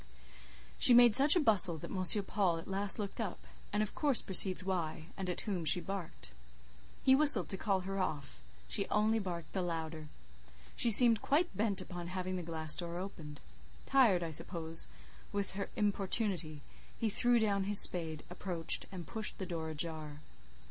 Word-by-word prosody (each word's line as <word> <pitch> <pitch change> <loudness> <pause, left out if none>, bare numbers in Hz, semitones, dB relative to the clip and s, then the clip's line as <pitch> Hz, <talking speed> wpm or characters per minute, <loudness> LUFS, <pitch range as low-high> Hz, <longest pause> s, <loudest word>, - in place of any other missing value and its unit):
She 245 - +6
made 240 -2 +5
such 280 - +5
a - - +2
bustle 200 - +5
that - - -11
M. 190 +2 +3
Paul 190 -4 -2
at 165 - -11
last 195 +1 0
looked 205 +1 -7
up, 200 -5 -8 0.3
and 210 +1 -2
of 210 - -3
course 285 -5 +1
perceived 185 -1 +5
why, 170 -4 -5
and 190 -2 -7
at 180 - -4
whom 190 -6 -5
she 160 +3 +3
barked. 175 - -9 0.7
He 265 - +3
whistled 290 +2 +7
to - - +3
call 195 -2 -3
her 195 +1 -7
off; 145 -8 -6 0.3
she - - -4
only 215 +2 -1
barked 175 -5 -8
the 190 - -3
louder. 160 -3 -7 0.7
She 235 - +1
seemed 230 0 +7
quite 310 - -2
bent 205 -1 -2
upon 175 -2 -9
having 185 +1 -6
the 180 - -5
glass 160 -2 0
door 170 -1 -7
opened. 165 -6 -10 0.5
Tired, 230 -10 +1
I 165 - -6
suppose, 165 +1 0 0.4
with 200 -1 -5
her 200 +1 -7
importunity, 195 -6 -2 0.4
he 230 - -2
threw 245 +3 0
down 200 -3 -2
his 205 0 +6
spade, 160 -3 +3
approached, 175 -2 -2
and 180 -3 -10
pushed 220 -2 -5
the 190 - -7
door 165 -3 -7
ajar. 155 -1 -7
185 Hz, 175 wpm, -31 LUFS, 165-210 Hz, 0.7 s, whistled